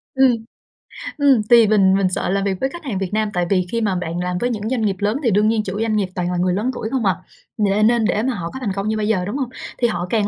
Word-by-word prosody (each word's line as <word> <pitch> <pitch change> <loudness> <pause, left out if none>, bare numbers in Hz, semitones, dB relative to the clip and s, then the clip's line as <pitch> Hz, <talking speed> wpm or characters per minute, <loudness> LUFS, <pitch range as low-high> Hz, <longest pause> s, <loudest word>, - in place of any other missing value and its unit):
Ừm. 265 -1 +5 0.9
Ừm, 280 -5 +4
thì 235 -2 +7
mình 195 -3 +4
mình 195 -2 +2
sợ 180 - -2
làm 195 +1 0
việc 195 -1 -1
với 265 - +1
khách 345 +4 -10
hàng 245 -9 -3
Việt 190 -1 -2
Nam, 215 0 +1
tại 180 0 0
vì 185 -2 +2
khi 230 - -1
mà 205 -4 0
bạn 175 -1 -3
làm 180 0 -2
với 245 +7 0
những 220 -2 -3
doanh 255 -2 -1
nghiệp 205 -3 +1
lớn 210 +4 0
thì 235 - +2
đương 210 +2 +3
nhiên 220 -1 +1
chủ 200 0 -4
doanh 225 -1 0
nghiệp 205 -3 +1
toàn 180 -1 -1
là 180 - -2
người 180 +1 +1
lớn 215 +7 -1
tuổi 220 -3 -4
không 260 -5 -1
à, 190 -2 +3 0.5
n 210 +1 +3
nên 235 -1 +2
để 215 0 +1
mà 260 +1 0
họ 170 -6 -4
có 265 - -6
thành 215 -7 -2
công 195 +1 -3
như 220 0 0
bây 210 -1 -1
giờ, 190 -5 +1
đúng 205 +8 -3
hông? 265 -4 -2 0.3
Thì 240 - +2
họ 175 -5 -3
càng 215 -3 +1
210 Hz, 310 wpm, -20 LUFS, 190-230 Hz, 0.9 s, thì